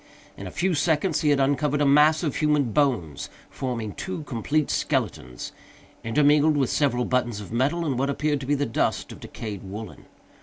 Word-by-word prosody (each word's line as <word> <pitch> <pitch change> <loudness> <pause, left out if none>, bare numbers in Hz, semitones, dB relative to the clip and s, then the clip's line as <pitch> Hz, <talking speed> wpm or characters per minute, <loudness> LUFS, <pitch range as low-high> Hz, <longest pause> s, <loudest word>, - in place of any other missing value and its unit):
In 100 - -8
a - - -5
few 180 - 0
seconds 160 +2 +1
he 150 - +2
had 145 -1 +3
uncovered 145 +1 +1
a 145 - +3
mass 150 +3 +5
of 150 -5 -1
human 150 -5 +2
bones, 120 - 0 0.2
forming 115 -6 -4
two 185 -4 -5
complete 145 +3 -1
skeletons, 60 0 -2 0.5
intermingled 145 +5 +3
with 135 -3 +1
several 125 -4 +1
buttons 120 -4 0
of 105 - -9
metal, 140 +9 0
and 135 -5 -1
what 135 +1 0
appeared 145 +1 0
to 130 - -7
be 145 - +2
the 145 0 0
dust 115 - -1
of - - -10
decayed 105 -4 -7
woollen. 105 +3 -9
140 Hz, 185 wpm, -25 LUFS, 115-150 Hz, 0.5 s, mass